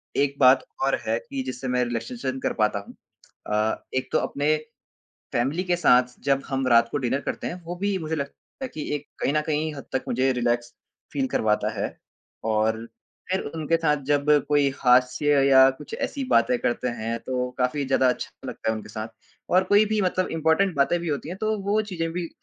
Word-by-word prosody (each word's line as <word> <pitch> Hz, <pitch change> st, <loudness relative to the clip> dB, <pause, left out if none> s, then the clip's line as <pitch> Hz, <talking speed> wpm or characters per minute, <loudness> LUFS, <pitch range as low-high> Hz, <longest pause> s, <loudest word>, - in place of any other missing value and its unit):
एक 140 Hz, 0 st, +1 dB
बात 130 Hz, 0 st, +6 dB, 0.2 s
और 135 Hz, -, +3 dB
है 115 Hz, +1 st, +2 dB
कि 135 Hz, -1 st, -3 dB
जिससे 130 Hz, 0 st, -5 dB
मैं 125 Hz, 0 st, +1 dB
रिलैक्सेशन 120 Hz, +3 st, -4 dB
कर -, -, -1 dB
पाता 105 Hz, -2 st, +1 dB
हूँ। 100 Hz, -, -12 dB, 0.5 s
अ, 105 Hz, +1 st, 0 dB
एक 130 Hz, -, -1 dB
तो -, -, +3 dB
अपने 145 Hz, +2 st, +1 dB, 0.8 s
फैमिली 140 Hz, +9 st, 0 dB
के 180 Hz, -1 st, +1 dB
साथ 125 Hz, -7 st, +3 dB
जब 140 Hz, -1 st, +2 dB
हम 135 Hz, -1 st, -1 dB
रात 115 Hz, -1 st, +5 dB
को -, -, 0 dB
डिनर 130 Hz, 0 st, 0 dB
करते -, -, -4 dB
हैं, 180 Hz, +1 st, -6 dB
वो 170 Hz, +2 st, -5 dB
भी 200 Hz, +2 st, -1 dB
मुझे 160 Hz, -1 st, -3 dB
लगता 140 Hz, -2 st, -4 dB, 0.3 s
है 265 Hz, -, -2 dB
कि 155 Hz, -, -7 dB
एक 145 Hz, -, -6 dB
कहीं 140 Hz, -, 0 dB
न 150 Hz, -, +2 dB
कहीं 155 Hz, 0 st, -1 dB
हद 140 Hz, -2 st, -8 dB
तक 130 Hz, -, 0 dB
मुझे 130 Hz, +2 st, +2 dB
रिलैक्स 120 Hz, -1 st, -1 dB, 0.4 s
फील 270 Hz, -1 st, 0 dB
करवाता 105 Hz, -, +1 dB
है। -, -, 0 dB, 0.6 s
और 110 Hz, +1 st, +1 dB, 0.4 s
फिर 190 Hz, +1 st, +1 dB
उनके 160 Hz, +1 st, +1 dB
साथ 150 Hz, -2 st, +2 dB
जब 145 Hz, +1 st, +1 dB, 0.2 s
कोई 145 Hz, -1 st, +3 dB
हास्य 130 Hz, +3 st, +4 dB
या 130 Hz, -1 st, +7 dB
कुछ -, -, -11 dB
ऐसी 290 Hz, -, -3 dB
बातें 250 Hz, -1 st, +4 dB
करते 125 Hz, -, -1 dB
हैं 115 Hz, +1 st, -2 dB
तो 125 Hz, +1 st, -2 dB
काफ़ी 130 Hz, +3 st, 0 dB
ज़्यादा 130 Hz, -1 st, +3 dB
अच्छा 125 Hz, -, -2 dB, 0.2 s
लगता 110 Hz, -, -3 dB
है 110 Hz, -, +1 dB
उनके 110 Hz, -, -8 dB
साथ, 110 Hz, +1 st, -5 dB, 0.4 s
और 185 Hz, +1 st, +4 dB
कोई 205 Hz, +3 st, +4 dB
भी 215 Hz, 0 st, 0 dB
मतलब 185 Hz, 0 st, +1 dB
इम्पॉर्टेंट 165 Hz, +3 st, +2 dB
बातें 140 Hz, +5 st, +2 dB
भी 170 Hz, -, -5 dB
होती 145 Hz, +1 st, -3 dB
हैं, 180 Hz, -, -6 dB
तो 215 Hz, +1 st, 0 dB
वो 205 Hz, +2 st, +1 dB
चीज़ें 170 Hz, -6 st, -3 dB
भी 175 Hz, -1 st, -3 dB
140 Hz, 205 wpm, -25 LUFS, 125-165 Hz, 0.8 s, या